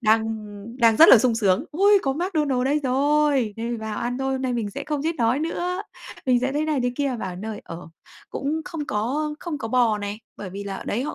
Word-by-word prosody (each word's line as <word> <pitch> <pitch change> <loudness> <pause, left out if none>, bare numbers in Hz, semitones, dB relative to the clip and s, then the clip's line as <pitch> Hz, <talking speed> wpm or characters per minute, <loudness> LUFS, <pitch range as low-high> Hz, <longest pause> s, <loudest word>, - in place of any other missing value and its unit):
Đang, 220 -1 +4
ưm, 215 +1 -7
đang 230 -2 +5
rất 325 - +8
là 235 - +10
sung 240 0 +2
sướng: 210 +4 +2
"Ôi, 400 +5 +5
có 270 - 0
McDonald's 300 -6 0
đây 295 +3 +1
rồi! 275 -3 +2
Đây, 235 +1 -3
vào 220 -1 -5
ăn 245 +2 -2
thôi, 270 0 -1
hôm 265 0 -2
nay 255 -1 -1
mình 220 -4 -2
sẽ - - -6
không 300 -2 -2
chết 330 0 -1
đói 235 +3 +2
nữa", 355 +4 -2 0.4
mình 250 -1 +3
sẽ 265 +1 -1
thế 300 +2 0
này 305 -4 0
thế 245 0 0
kia. 275 -4 -1
Vào 185 - -3
đến 180 +1 -8
nơi, 215 -1 -5
ờ, 165 0 -9 0.4
cũng 300 +3 -2
không 330 -5 -5
có 270 +9 -1
không 325 -5 -4
có 225 - -5
bò 230 -3 +2
này, 205 +2 -5 0.2
bởi 195 - -7
vì 200 +2 -6
là 195 -1 -4
ở - - -8
đấy 235 +5 -1
họ - - -4
250 Hz, 255 wpm, -24 LUFS, 220-295 Hz, 0.4 s, là